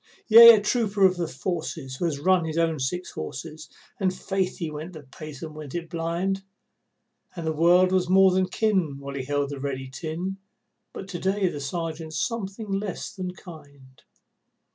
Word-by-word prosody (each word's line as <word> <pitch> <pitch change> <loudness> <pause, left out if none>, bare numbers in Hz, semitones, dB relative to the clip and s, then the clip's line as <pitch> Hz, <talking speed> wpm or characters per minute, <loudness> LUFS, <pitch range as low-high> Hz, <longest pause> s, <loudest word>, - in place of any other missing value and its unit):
Yea, 230 +1 +11
a - - +2
trooper 210 -2 +1
of 185 -1 +4
the 175 -2 -2
forces 160 -3 -4
who 175 - -2
has 150 -4 -1
run 185 +3 +3
his 160 0 -4
own 165 -2 +1
six 175 +8 -3
horses, 150 - -7 0.3
And 190 -2 +2
faith 190 0 -2
he 165 -3 -4
went 155 +4 -7
the 155 -3 -10
pace 145 +2 -10
and 160 -1 -7
went 150 -2 -9
it 170 -1 -5
blind, 170 +3 -1 0.9
And 170 -2 -5
the 160 - 0
world 175 +4 +4
was 185 -1 +1
more 190 0 +6
than 185 0 +2
kin 185 -7 0
while 140 0 -7
he 135 -2 -4
held 145 0 -1
the 140 - -6
ready 135 -1 -4
tin, 170 +7 -4 0.5
But 190 - -8
to 175 - -5
day 195 +1 +1
the 145 - -6
Sergeant's 160 +2 -4
something 215 -2 -3
less 195 0 -3
than 185 -3 -5
kind. 140 -7 -14
170 Hz, 185 wpm, -25 LUFS, 150-190 Hz, 0.9 s, Yea